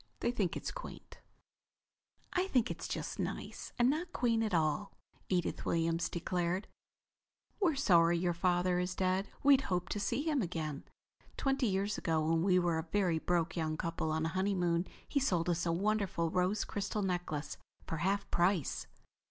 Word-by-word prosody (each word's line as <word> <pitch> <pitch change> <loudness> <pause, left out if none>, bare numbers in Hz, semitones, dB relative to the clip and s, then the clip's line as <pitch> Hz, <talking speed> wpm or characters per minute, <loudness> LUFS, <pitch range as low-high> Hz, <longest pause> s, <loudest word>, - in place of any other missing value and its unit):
They 240 - +2
think 200 -8 -1
it's - - -4
quaint." - - -9 1.1
"I 365 +1 +1
think 250 - +2
it's - - -5
just - - -4
nice, - - -4
and 240 -1 +4
not 325 +6 0
quaint 230 -5 +1
at 220 -1 0
all," 165 +4 +1 0.4
Edith 180 -2 0
Williams 165 0 +1
declared. 180 +2 -1 0.9
"We're 345 -7 +3
sorry 170 -10 +4
your 175 0 +1
father 180 +1 +2
is 180 0 -2
dead. 185 +1 +1 0.2
We'd 275 -1 +7
hoped 180 0 -1
to 205 - -1
see 265 +7 0
him 305 -4 +1
again. 160 -6 -3 0.5
Twenty 270 -2 +1
years 200 +1 0
ago 160 -2 +1
when 165 0 +2
we 185 +1 +4
were 175 -2 +2
a 160 - -6
very 185 -5 +2
broke 175 +2 0
young 155 -2 -1
couple 165 -1 -2
on 160 0 0
a - - 0
honeymoon 180 -2 +1 0.2
he 285 - +1
sold 180 -10 +1
us 175 0 0
a - - +2
wonderful 195 -3 0
rose 185 +4 +1
crystal 205 0 -2
necklace 175 -5 -2 0.3
for 165 - -3
half 195 +5 0
price." 175 -3 +1
180 Hz, 170 wpm, -33 LUFS, 170-205 Hz, 1.1 s, We'd